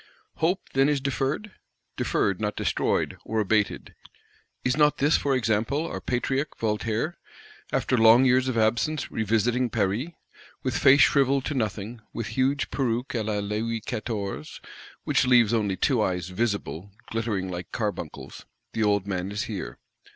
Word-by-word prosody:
Hope, 180 +4 +1
then, 135 +1 +4
is 145 -2 +1
deferred? 140 - -2 0.4
Deferred; 100 +1 0
not 105 -1 -1
destroyed, - - 0
or 110 - -2
abated. 105 0 0 0.7
Is 125 - +2
not 150 0 +4
this, 145 +3 +3
for 140 -2 +1
example, 115 +6 0
our - - -5
Patriarch 135 +3 -1
Voltaire, 110 +8 -1 0.5
after - - +1
long 115 +2 +7
years 130 0 +3
of 130 -3 -1
absence, 120 +7 +1
revisiting 115 +3 +1
Paris? 110 - 0 0.6
With - - -1
face 140 +2 +6
shrivelled 135 -1 +3
to - - -2
nothing; 110 -1 -3
with 115 -3 -4
"huge 135 +2 0
peruke 125 -1 -1
à 115 -3 -1
la 105 -1 -1
Louis 110 +3 -2
Quatorze, 100 - -5 0.4
which - - +2
leaves 120 -3 +5
only 100 -4 0
two 130 -6 +2
eyes 90 -3 -1
'visible' 100 -3 -2 0.2
glittering 105 -5 -2
like 90 0 -6
carbuncles," 105 -8 -5 0.3
the 110 - -2
old 100 -2 +2
man 95 -1 -3
is 105 +4 -2
here. 95 - -5
115 Hz, 150 wpm, -26 LUFS, 105-130 Hz, 0.7 s, long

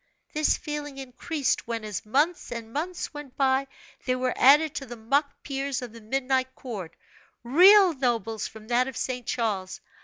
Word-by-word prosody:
This 305 0 +2
feeling 295 -2 -6
increased 270 +2 -2
when, 230 -2 -3
as 210 0 -5
months 295 +9 +1
and 230 -1 -6
months 340 +4 -3
went 295 -3 -10
by, 270 0 +2 0.4
they 255 - +1
were 255 0 -1
added 295 +3 +6
to 275 - -5
the 240 - -7
mock 280 +6 -1
peers 275 -1 -2
of 240 -3 -8
the 230 - -12
Midnight 260 +3 -1
Court, 205 -10 -7 0.5
real 365 - +7
nobles 230 -5 -1
from 220 -1 -13
that 245 +1 +3
of 265 -2 -6
St. 250 -3 -3
Charles. 200 -6 -2
260 Hz, 165 wpm, -26 LUFS, 230-290 Hz, 0.5 s, real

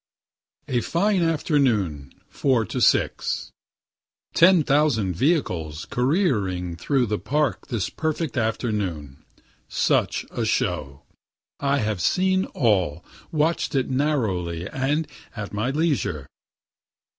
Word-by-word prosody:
A 120 -2 0
FINE 195 - +1
AFTERNOON, 125 - +1 0.2
4 130 -5 +1
TO - - -4
6 - - +1 0.8
Ten 175 -1 +6
thousand 140 -10 +2
vehicles 85 - 0
careering 110 - 0
through 125 - +1
the 105 -1 -2
Park 140 - -1
this 115 -5 -2
perfect 160 -1 -2
afternoon. 105 - -2 0.5
Such - - +1
a - - -2
show! 70 -2 -1 0.6
and 140 - -1
I 140 - +3
have 110 -7 -1
seen 190 - +2
all 95 - +1 0.3
watch'd 160 -1 0
it 135 -1 0
narrowly, 100 - -1
and 145 +6 -1 0.3
at 105 -2 -6
my 110 +5 -1
leisure. 140 - 0
125 Hz, 110 wpm, -24 LUFS, 90-150 Hz, 0.8 s, Ten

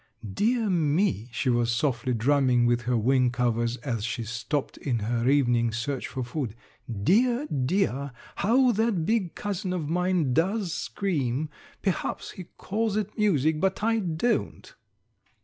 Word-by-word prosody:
"Dear 230 - +1
me," 160 - +1
she 125 +3 0
was 120 -1 +2
softly 120 0 0
drumming 125 0 +3
with 120 0 +2
her 125 - +3
wing 125 +3 +3
covers 120 -1 0
as 115 -6 -2
she 115 0 -2
stopped 125 +6 -3
in 125 -5 -1
her 115 +3 0
evening 120 -5 +3
search 120 +4 -3
for 130 -1 -4
food. 125 -3 -4 0.4
"Dear, 235 - +2
dear! 140 - 0 0.3
how 245 +4 +4
that 220 -6 +1
big 215 -5 0
cousin 195 -2 -3
of 160 -5 -3
mine 180 -5 +1
does 185 - +1
scream! 150 -6 -2 0.3
Perhaps 190 -3 -2
he 185 - -9
calls 215 +1 -1
it 210 0 -3
music, 160 - +2
but 190 +1 0
I 225 0 +2
don't." 180 +5 -1
145 Hz, 145 wpm, -27 LUFS, 120-195 Hz, 0.4 s, how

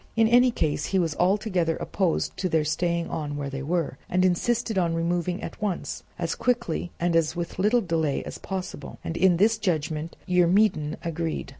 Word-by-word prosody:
In 225 -1 +4
any 245 +2 +6
case 160 -11 -1
he 195 - 0
was 165 -4 +1
altogether 185 -3 +1
opposed 185 -5 -1
to 185 - -1
their 160 -2 +2
staying 170 +2 0
on 145 -2 -3
where 140 -1 -4
they 135 0 -4
were, 160 -2 -1
and 185 +1 +2
insisted 225 +5 +1
on 170 -3 +1
removing 175 +2 -1
at - - -7
once, 205 -4 -2 0.2
as 170 -1 -1
quickly 230 -9 -1
and 175 0 +1
with 165 0 +2
as - - -12
little 215 +5 +3
delay 160 -6 0
as - - -7
possible; 185 -7 -6
and 165 - -4
in 180 -1 +4
this 215 +5 +3
judgment 160 -3 -2
Eurymedon 180 -3 +3
agreed. 165 -1 -3
175 Hz, 180 wpm, -26 LUFS, 160-190 Hz, 0.2 s, any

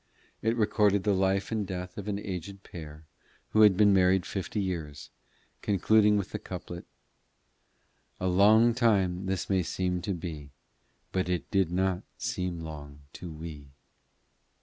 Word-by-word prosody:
It 115 +2 0
recorded 105 -2 +2
the 105 - +2
life 95 +1 +1
and 110 -2 0
death 90 -1 -6
of 105 0 -7
an 100 -1 -1
aged 100 -1 -6
pair 80 -2 -10 0.4
who 110 - +3
had 105 -4 +7
been 105 -1 +5
married 95 -1 +3
fifty 95 +2 -4
years, 85 -7 -4 0.5
concluding 105 +1 +3
with 100 - -3
the - - -4
couplet - - -8 1.3
"A 95 - -3
long 110 +6 +5
time 95 -6 +1
this 95 -1 -2
may 95 -2 +2
seem 90 +1 -2
to 100 +1 -2
be, 80 -4 -7 0.6
But 95 -1 -1
it 90 -1 -2
did 95 -4 +2
not 95 0 0 0.2
seem 90 -2 -3
long 75 -3 -9
to 90 -2 -8
we." 75 -3 -9
95 Hz, 150 wpm, -29 LUFS, 85-100 Hz, 1.3 s, had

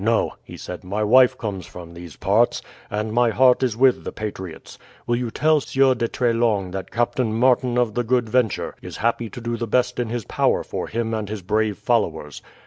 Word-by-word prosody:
"No," 115 +1 +1
he - - -11
said, 90 +1 -8
"my 100 +4 -2
wife 125 +4 +5
comes 100 -5 -5
from 85 -1 -11
these 85 -2 -10
parts, 105 +5 +1 0.3
and 105 +1 -3
my 120 0 +3
heart 125 +4 +4
is 120 -4 0
with 130 0 +3
the - - -5
patriots. 95 -5 -7 0.3
Will 120 - +1
you 120 -1 -2
tell 155 +5 +2
Sieur 135 0 +3
de 120 -2 -1
Treslong 115 -6 0
that 95 0 -5
Captain 120 0 0
Martin 125 +1 +2
of 120 -3 +1
the 120 - 0
Good 120 0 +1
Venture 110 -1 0
is - - -8
happy 115 0 -1
to 125 - -9
do 120 0 -3
the 115 - -3
best 125 +2 +1
in 120 -2 -1
his 120 -3 -3
power - - +1
for - - -5
him 115 0 -2
and 110 -2 -3
his 105 -3 -5
brave 105 +1 0
followers. 80 - -1
115 Hz, 210 wpm, -22 LUFS, 105-125 Hz, 0.3 s, wife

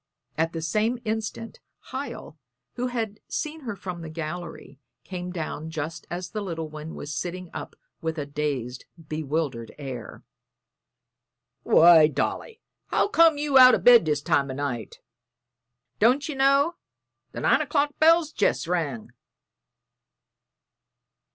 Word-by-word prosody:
At 165 +1 0
the 165 -1 -4
same 215 +9 0
instant 220 +1 -4 0.3
Hiel, 260 - -6 0.3
who 250 +1 -2
had 225 -4 -3
seen 310 +1 -4
her 235 -8 -5
from 180 -3 -7
the 160 - -7
gallery, 160 -3 -7 0.2
came 180 -1 -6
down 160 -2 -5
just 160 +1 -5
as 175 0 -5
the 215 - -3
little 165 -5 -4
one 155 +1 -8
was 145 +1 -6
sitting 180 +4 -5
up - - -7 0.3
with 160 0 -3
a 145 - -3
dazed, 140 -4 -3 0.2
bewildered 150 -6 -3
air. 130 -5 -8 1.4
"Why, 165 -2 +7
Dolly, 445 - -3 0.3
how - - +1
came 330 -5 +5
you 290 -2 +4
out 255 0 +9
o' - - +1
bed 240 -7 +7
this 150 -2 0
time 140 -1 +1
o' 130 - -4
night? 130 -5 -4 1.0
Don't 255 +8 +3
ye 310 - -4
know 275 +5 +3 0.5
the - - -6
nine - - +3
o'clock 290 -1 0
bell's 325 0 +5
jest 205 - +1
rung?" 150 -10 -2
175 Hz, 135 wpm, -25 LUFS, 155-245 Hz, 1.4 s, out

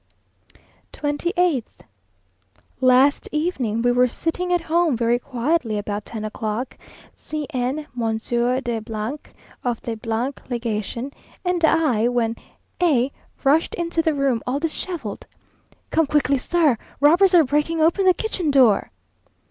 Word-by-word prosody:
28th. 305 - 0 1.2
Last 260 +2 +4
evening 270 -9 -1
we 245 - +4
were 250 +1 +4
sitting 345 +8 -2
at 350 -1 +2
home 330 -4 +1
very 235 +1 +2
quietly 250 -2 -1
about 205 0 -4
ten 220 -2 -6
o'clock, 215 +3 -4 0.4
C 305 -1 -5
n, 260 +3 -2
Monsieur 235 +2 0
de, 240 -3 -2 0.9
of 240 -2 -1
the 230 +3 -2 0.2
Legation, 235 +1 -3 0.3
and 355 -1 0
I, 300 -9 +3
when 235 -2 0 0.5
A 280 -7 +3 0.3
rushed 295 +4 +3
into 335 -1 -1
the 320 -2 +1
room 270 -5 +1
all 265 +3 0
dishevelled. 320 - -5 0.6
"Come 325 -2 +2
quickly, 280 -2 +2
sir! 300 -5 +2 0.2
Robbers 350 +6 +5
are 335 - +7
breaking 300 +4 0
open 340 +5 +3
the 365 - +6
kitchen 375 -7 -2
door!" 255 -7 +4
270 Hz, 125 wpm, -22 LUFS, 235-325 Hz, 1.2 s, are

